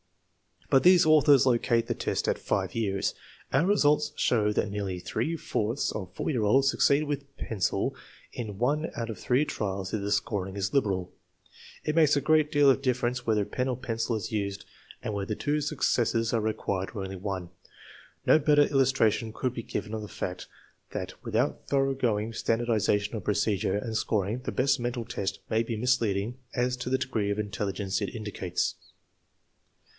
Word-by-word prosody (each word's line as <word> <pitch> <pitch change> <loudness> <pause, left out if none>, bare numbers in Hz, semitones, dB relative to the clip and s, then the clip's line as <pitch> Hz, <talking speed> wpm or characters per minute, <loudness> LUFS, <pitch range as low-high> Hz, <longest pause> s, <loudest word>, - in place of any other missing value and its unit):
But 135 -2 +6
these 180 -2 +7
authors 145 -3 +6
locate 120 -2 +2
the - - -1
test - - -2
at - - 0
5 95 -2 -1
years. 100 -4 -1 0.4
Our 150 +7 +3
results 150 -6 +3
show 105 -4 +2
that 105 - 0
nearly 100 -3 -3
three 110 - -2
fourths 115 -4 -1
of 95 -2 -6
4 - - -2
year 120 -6 0
olds 135 +6 +4
succeed 140 +1 +3
with 140 -2 -5
pencil 100 -5 -1 0.4
in 105 -5 -6
one 145 +7 +1
out 115 -1 -3
of 105 - -8
three 135 +3 +2
trials 95 -7 -3
if 110 - -1
the 100 +1 -3
scoring 100 -2 -1
is 100 -1 -2
liberal. 95 -9 0 0.7
It 155 - -1
makes 155 -2 +5
a 140 - +1
great 155 +1 +3
deal 145 -1 +5
of 135 - 0
difference 125 -1 -1
whether 105 -2 +2
pen 125 +5 -2
or 125 -2 -1
pencil 115 -2 -2
is 105 -4 -4
used, 100 -2 -3 0.4
and 110 - -3
whether 100 +1 -2
two 150 +6 0
successes 120 -6 +1
are 115 - +2
required 100 -3 -2
or 100 - -3
only 95 0 -6
one. 95 -2 -4 0.8
No - - +6
better 145 -1 +5
illustra 135 -5 +3
tion 110 +1 -4
could 125 +1 -2
be 115 - -5
given 105 - -4
of 110 - -3
the 105 - -6
fact 90 -2 -5 0.4
that 90 -1 -4
without 120 +3 -1
thoroughgoing 130 -6 +1
standardization 115 -2 0
of 105 - -5
procedure 105 -1 +1
and 110 +1 -4
scoring 110 +1 0
the 130 - -4
best 140 +1 +2
mental 120 -1 -3
test 100 -2 -3
may 110 0 +2
be 115 0 -3
misleading 115 -1 0 0.2
as 125 0 +1
to 125 0 -4
the 130 - +2
degree 125 -6 -1
of 100 - -1
intelligence 100 -1 -2
it 100 - -3
indicates. 105 -5 -2
115 Hz, 180 wpm, -28 LUFS, 100-135 Hz, 0.8 s, these